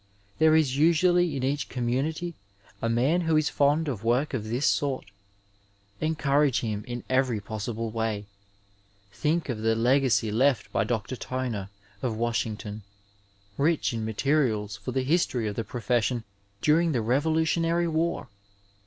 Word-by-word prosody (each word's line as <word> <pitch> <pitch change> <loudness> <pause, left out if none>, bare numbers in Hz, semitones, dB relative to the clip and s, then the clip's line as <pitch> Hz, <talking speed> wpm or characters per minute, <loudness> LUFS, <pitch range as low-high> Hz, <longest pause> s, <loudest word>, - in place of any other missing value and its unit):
There 160 0 +5
is 145 -5 +3
usually 170 +1 +3
in 130 - -3
each 140 +2 -1
community 140 +8 -2 0.5
a 115 - 0
man 130 +10 +2
who 160 -2 +2
is 155 -1 +2
fond 145 +3 +2
of 115 -7 -3
work 125 +6 +1
of 115 -5 -2
this 120 +6 -1
sort. 140 -3 +1 0.9
Encourage 150 -3 +2
him 105 -3 -3
in 120 0 -5
every 130 -4 +1
possible 110 +2 -4
way. 110 -2 -2 0.9
Think 160 +2 0
of 120 -5 -3
the 115 +1 +1
legacy 120 -1 +2
left 125 0 +2
by - - +1
Dr. 120 +1 -2
Toner, 120 -7 -4 0.3
of 115 -4 -2
Washington, 110 -2 -2 0.8
rich 155 -2 +2
in 115 -1 -3
materials 110 -3 0
for 110 +4 -6
the 130 0 0
history 130 -6 +1
of 105 - -3
the 115 - -2
profession 120 +1 -1 0.4
during 165 +2 +3
the 120 - +1
Revolutionary 160 +6 +1
War 165 -1 -1
130 Hz, 145 wpm, -27 LUFS, 115-155 Hz, 0.9 s, There